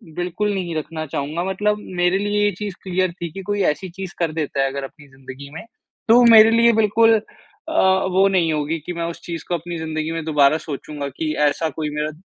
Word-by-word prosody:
बिल्कुल 180 +4 -2
नहीं 180 -4 -3
रखना 155 +1 -4
चाहूँगा, 150 +4 -3
मतलब 210 +2 0 0.2
मेरे 180 +2 +3
लिए 205 0 0
ये 205 - +2
चीज़ 205 -3 -4
क्लियर 185 -1 0
थी 170 - -3
कि 195 - -7
कोई 205 +1 -2
ऐसी 185 +6 -9
चीज़ 190 +1 -8
कर 170 -2 0
देता 150 -3 -2
है - - +1
अगर 140 0 -5
अपनी 145 +1 -14
ज़िंदगी 135 +1 -11
में 160 - -8 0.5
तो 230 - +8
वो 245 - +6
मेरे 220 0 +8
लिए 230 0 +5
बिल्कुल 225 +2 +4 0.6
अ, 320 - -4 0.4
वो 190 +2 +4
नहीं 175 -4 +2
होगी 155 +2 -2
कि 180 - -3
मैं 170 -1 -4
उस - - -13
चीज़ 170 -1 -6
को 175 - +1
अपनी 170 +1 -5
ज़िंदगी 160 0 -3
में 165 -1 -3
दोबारा 150 -1 +3
सोचूँगा 145 -1 -6
कि 155 -1 -1
ऐसा 160 +2 -1
कोई 155 -1 -2
मेरा 150 +1 -2
170 Hz, 220 wpm, -21 LUFS, 155-195 Hz, 0.6 s, तो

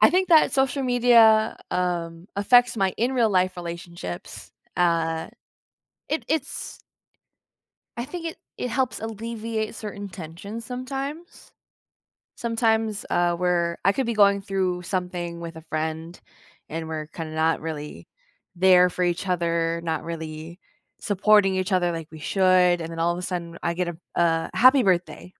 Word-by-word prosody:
I - - +7
think 370 +2 +2
that 320 -2 +6
social 270 +1 +1
media, 235 -3 +5
um, 175 -1 -2
affects 245 +4 +4
my 195 -3 +1
in 245 +4 0
real 235 -4 +2
life 185 -1 +1
relationships, 170 - -7 0.3
uh, 165 -2 +1 0.8
it 310 - -2
it's 300 -2 -3 1.2
I 235 - -3
think 335 +5 -6
it 325 - -5 0.2
it 250 - -3
helps 255 +1 -1
alleviate 225 0 -4
certain 205 -2 -6
tensions 190 +6 -8
sometimes 270 +7 -6 0.8
sometimes, 225 -2 0
uh, 175 0 +2
we're 170 -1 +1
I 195 - +5
could 265 +1 -1
be 235 - -1
going 200 -1 +5
through 185 -2 -1
something 180 -2 -3
with 170 -1 -7
a 160 - -9
friend, 160 +2 -4 0.5
and 160 0 -5
we're 155 -1 -4
kinda 160 -1 -7
not 160 +1 +1
really 150 -2 -7 0.5
there 180 0 +6
for 180 +1 -1
each 175 +2 -1
other, 170 -1 0
not 160 -2 -2
really 160 0 -7 0.4
supporting 205 -1 +3
each 185 +1 -1
other 175 -2 +2
like 165 -2 -6
we 160 - -10
should, 180 +1 +3
and 165 - -4
then 165 - -7
all 170 +1 +2
of 175 - -5
a - - -5
sudden 175 -2 -4
I 170 - 0
get 180 0 -1
a 175 - -5 0.2
a 165 -1 +2
happy 255 +3 +6
birthday. 180 -1 -1
180 Hz, 155 wpm, -24 LUFS, 170-225 Hz, 1.2 s, I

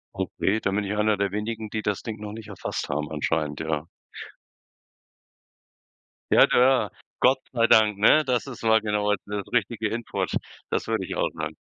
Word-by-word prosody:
Okay, 105 +3 -1
dann 100 - -1
bin 105 - 0
ich 105 +2 -2
einer 105 0 +2
der 100 -1 0
wenigen, 110 +1 -4
die 110 +1 -3
das 100 -1 -2
Ding 110 -2 -6
noch 105 0 -7
nicht 110 -1 -9
erfasst 100 - -5
haben 75 +2 -2
anscheinend, 75 0 -1
ja. 80 -1 -2 2.5
Ja, - - +8
da 125 -4 +3 0.3
Gott 130 +1 +5
sei 115 -2 +3
Dank, 105 -3 +5
ne? 155 +8 +5
Das 125 +1 0
ist 130 - -8
mal 110 0 +4
genau, 105 -1 0
also, 105 - 0
das 100 -1 -4
richtige 115 -1 0
Input, 115 +2 -3 0.4
das - - -1
würde 110 -4 -1
ich - - -5
auch - - 0
sagen. 80 -1 -5
105 Hz, 180 wpm, -25 LUFS, 100-115 Hz, 2.5 s, Ja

